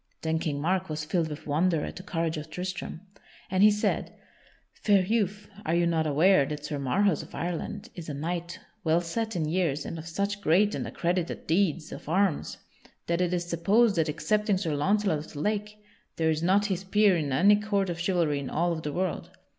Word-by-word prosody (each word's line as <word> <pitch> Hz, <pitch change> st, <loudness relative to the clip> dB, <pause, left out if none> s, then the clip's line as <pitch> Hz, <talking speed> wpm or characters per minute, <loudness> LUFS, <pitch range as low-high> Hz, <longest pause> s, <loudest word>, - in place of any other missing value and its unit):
Then 160 Hz, 0 st, 0 dB
King 145 Hz, -3 st, -2 dB
Mark 185 Hz, +4 st, 0 dB
was 155 Hz, 0 st, -3 dB
filled 165 Hz, +1 st, 0 dB
with 150 Hz, -1 st, -8 dB
wonder 160 Hz, +2 st, +1 dB
at -, -, -7 dB
the -, -, -7 dB
courage 165 Hz, -3 st, -2 dB
of 155 Hz, 0 st, -6 dB
Tristram, 180 Hz, 0 st, -5 dB, 0.5 s
and 190 Hz, 0 st, +2 dB
he 210 Hz, -, +9 dB
said: 210 Hz, 0 st, 0 dB, 0.6 s
"Fair 200 Hz, -3 st, +3 dB
youth, 210 Hz, -1 st, -1 dB, 0.2 s
are 165 Hz, -, 0 dB
you 170 Hz, 0 st, +3 dB
not 165 Hz, -2 st, +1 dB
aware 160 Hz, +3 st, +5 dB
that 150 Hz, +1 st, -5 dB
Sir 150 Hz, -2 st, -3 dB
Marhaus 180 Hz, +6 st, +2 dB
of -, -, -11 dB
Ireland 170 Hz, -1 st, -4 dB
is 165 Hz, -3 st, -8 dB
a 145 Hz, -, -4 dB
knight 170 Hz, +4 st, -4 dB, 0.2 s
well 165 Hz, +1 st, +3 dB
set 220 Hz, +6 st, -3 dB
in 165 Hz, -3 st, 0 dB
years 160 Hz, -3 st, 0 dB
and 165 Hz, -, -5 dB
of 160 Hz, -, -8 dB
such 200 Hz, +4 st, -2 dB
great 200 Hz, +5 st, +3 dB
and -, -, -3 dB
accredited 175 Hz, 0 st, -2 dB
deeds 165 Hz, -2 st, +1 dB
of -, -, -8 dB
arms 185 Hz, -2 st, +1 dB, 0.5 s
that 170 Hz, +1 st, 0 dB
it 180 Hz, -1 st, +1 dB
is 175 Hz, -1 st, -1 dB
supposed 195 Hz, +7 st, +3 dB
that, 160 Hz, -1 st, +2 dB
excepting 210 Hz, +6 st, +1 dB
Sir 170 Hz, -5 st, -2 dB
Launcelot 195 Hz, +2 st, +1 dB
of 150 Hz, -, -10 dB
the 145 Hz, -, -7 dB
Lake, 210 Hz, +4 st, -2 dB, 0.4 s
there 160 Hz, -1 st, +2 dB
is 155 Hz, 0 st, -1 dB
not 190 Hz, +4 st, +3 dB
his 190 Hz, -2 st, -2 dB
peer 205 Hz, 0 st, +4 dB
in 150 Hz, -4 st, -1 dB
any 195 Hz, +10 st, +5 dB
court 205 Hz, -2 st, 0 dB
of 170 Hz, -1 st, -4 dB
chivalry 170 Hz, -5 st, +1 dB
in 140 Hz, -, -5 dB
all 170 Hz, +3 st, +1 dB
of 160 Hz, -1 st, -3 dB
the 150 Hz, -, -3 dB
world? 185 Hz, +1 st, -2 dB
175 Hz, 210 wpm, -28 LUFS, 160-195 Hz, 0.6 s, he